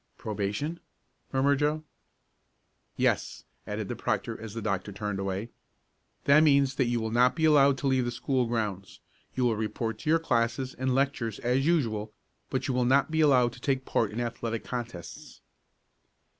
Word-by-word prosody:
"Probation?" 105 +10 -3 0.5
murmured 140 +1 +2
Joe. 150 +1 0 1.1
"Yes," - - 0 0.2
added - - -3
the - - -4
proctor - - -2
as 110 -1 -8
the - - -3
doctor 100 -1 -2
turned 105 0 -4
away. 95 +3 -3 0.7
"That 140 +2 +6
means 140 -3 +4
that 130 - +1
you 120 0 0
will 110 -1 -3
not 125 +2 +4
be 160 -1 +1
allowed 140 -3 +5
to 135 - -2
leave 130 -2 +2
the - - -1
school 125 0 0
grounds. 105 -5 -3 0.4
You 130 - 0
will 115 -2 +2
report 110 +1 -3
to 150 - -4
your 165 - +5
classes 125 -3 0
and 130 0 -1
lectures 130 -5 0
as 130 +4 +1
usual, 110 -11 0 0.4
but - - -2
you 130 - 0
will 125 0 +2
not 135 +5 +3
be 160 0 +2
allowed 125 -5 +4
to - - -13
take 130 -2 0
part 115 - +1
in 105 +3 -5
athletic 115 -1 -3
contests." 120 -8 -7
120 Hz, 170 wpm, -28 LUFS, 110-140 Hz, 1.1 s, That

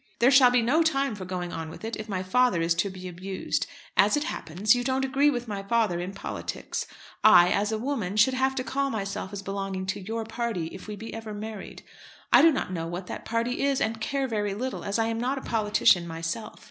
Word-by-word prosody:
There 245 +3 +5
shall 260 -2 +8
be 245 -1 +3
no 280 +8 +3
time 275 -6 +1
for 200 -3 -7
going 180 -1 -4
on 160 -1 -5
with 160 - -9
it, 225 - -3
if 215 0 -7
my 190 -2 -2
father 205 0 +3
is 165 0 +2
to 175 +4 0
be 185 -1 -8
abused. 185 +2 -3 0.3
As - - +4
it 295 - 0
happens, 210 - +1
you 245 0 0
don't 265 +1 0
agree 275 +2 +3
with 245 -3 -2
my 205 -2 -4
father 210 -4 +1
in 180 +2 -4
politics. 195 - -5 0.4
I, 175 0 +8
as 205 +2 +1
a 220 - 0
woman, 215 -6 -2
should 230 +5 +5
have 265 +1 +1
to 255 - -1
call 275 +1 -1
myself 200 -4 -4
as 200 -1 -6
belonging 195 -1 -3
to 190 +1 -2
your 225 +3 -4
party, 225 -7 -3
if 190 - -10
we 210 - -5
be 220 +3 -8
ever 220 -1 -6
married. 215 -1 -7 0.5
I - - +9
do 330 - +7
not 260 -9 -2
know 165 -2 -3
what 175 +2 -5
that - - -7
party 230 +2 -1
is, 275 -1 +2
and 220 0 -1
care 275 +3 -1
very 205 -4 -1
little, 255 +4 -4
as 200 +2 -1
I 225 - +2
am 225 0 -2
not 255 +4 -1
a - - -4
politician 210 -7 +3
myself. 165 +7 -5
215 Hz, 235 wpm, -27 LUFS, 190-250 Hz, 0.5 s, I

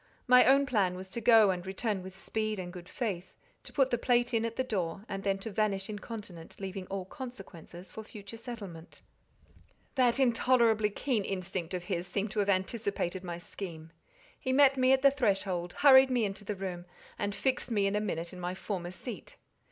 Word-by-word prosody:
My 250 -1 +7
own 275 +2 +5
plan 200 -8 +1
was 185 +1 -9
to 235 - -4
go 220 -3 +7
and 180 -1 -3
return 195 +1 -2
with 190 +1 -10
speed 215 +2 -2
and 180 -1 -6
good 180 -1 -10
faith, 190 -7 -4 0.3
to - - -10
put 270 -2 +2
the 240 - +1
plate 245 0 +2
in 230 0 +2
at 230 0 -3
the 260 - 0
door, 195 -4 -3
and 195 0 -4
then 195 -1 0
to 205 +3 -6
vanish 200 -1 0
incontinent, 205 -5 -8
leaving 190 -1 -5
all 195 -1 -4
consequences 190 - -10
for 220 - -7
future 210 0 -10
settlement. 205 -9 -9 0.9
That 255 -2 +3
intolerably 235 -4 +3
keen 220 +1 -1
instinct 185 -2 -3
of 180 - -4
his 180 -2 -3
seemed 200 +3 -2
to 215 - -2
have 200 -1 +1
anticipated 190 -2 -1
my 175 -2 -4
scheme: 165 -3 -8 0.5
he 260 - -2
met 275 0 +6
me 255 0 +4
at 265 0 +4
the 275 - +7
threshold, 195 -9 0
hurried 265 -2 +7
me 245 -3 +2
into 200 +1 -5
the 205 +1 -3
room, 185 -2 -5 0.3
and 205 0 -1
fixed 255 +3 -1
me 205 -4 +2
in 195 +1 +1
a 210 - +1
minute 170 -4 -3
in 180 - -9
my 180 +1 -3
former 185 -3 -4
seat. 185 +7 -8
200 Hz, 200 wpm, -31 LUFS, 185-235 Hz, 0.9 s, My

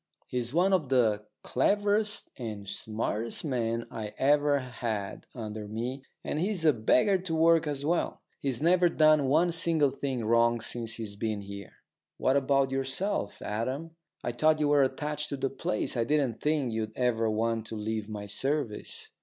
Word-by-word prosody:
He's 120 -1 -3
one 180 +6 +3
of 160 -8 +1
the 110 -5 +2 0.2
cleverest 205 - +1
and 105 -5 -6
smartest 110 +5 -3
men 115 -4 -1
I 105 -2 -6
ever 145 +1 +3
had 115 -6 -4
under 110 -3 -5
me, 120 +5 -4 0.2
and 150 - -2
he's 185 -1 -1
a 155 - +6
beggar 125 - +3
to 180 -3 -3
work 165 0 +4
as 145 -1 -3
well. 170 +2 0 0.2
He's 135 -1 -2
never 175 +1 +5
done 155 -3 +4
one 170 +6 +3
single 165 -4 +3
thing 130 -4 -3
wrong 115 +1 +3
since 115 0 -3
he's 110 -3 -5
been 105 0 -2
here." 100 -1 -9 0.4
"What 130 - +2
about 135 -1 +2
yourself, 135 - -2
Adam? 130 +10 -3 0.3
I 120 - -1
thought 155 +6 +3
you 150 -1 +2
were 145 -1 +5
attached 150 +3 -1
to 140 - -3
the 135 0 -1
place. 120 -5 -2
I 120 - +2
didn't 130 -3 0
think 150 -6 +1
you'd 110 -1 -3
ever 115 -3 +1
want 115 +1 -1
to 115 - -6
leave 110 0 -3
my 105 -1 -5
service." 130 +2 -3
130 Hz, 170 wpm, -29 LUFS, 110-150 Hz, 0.4 s, a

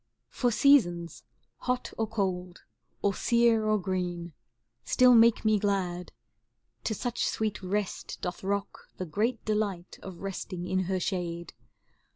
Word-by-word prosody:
For 245 - +1
seasons 175 -11 +3 0.4
hot 250 0 -2
or 225 - -1
cold, 185 -4 -3 0.4
or 200 - +3
sere 235 0 +3
or 215 0 +3
green, 180 -3 -2
^ - - -22 0.5
Still 250 0 +5
make 230 -1 +5
me 215 -1 +4
glad, 185 -3 -1 0.7
to 220 - 0
such 245 +3 -2
sweet 215 -2 -2
rest 195 +1 -3
doth 180 +1 -5
rock 200 +1 -3
The 185 - -3
great 220 +8 -1
delight 205 -5 -2
of 190 -3 -9
resting 185 -2 -5
in 185 0 0
her 190 +1 0
shade. 170 -2 -3
195 Hz, 140 wpm, -29 LUFS, 180-220 Hz, 0.7 s, Still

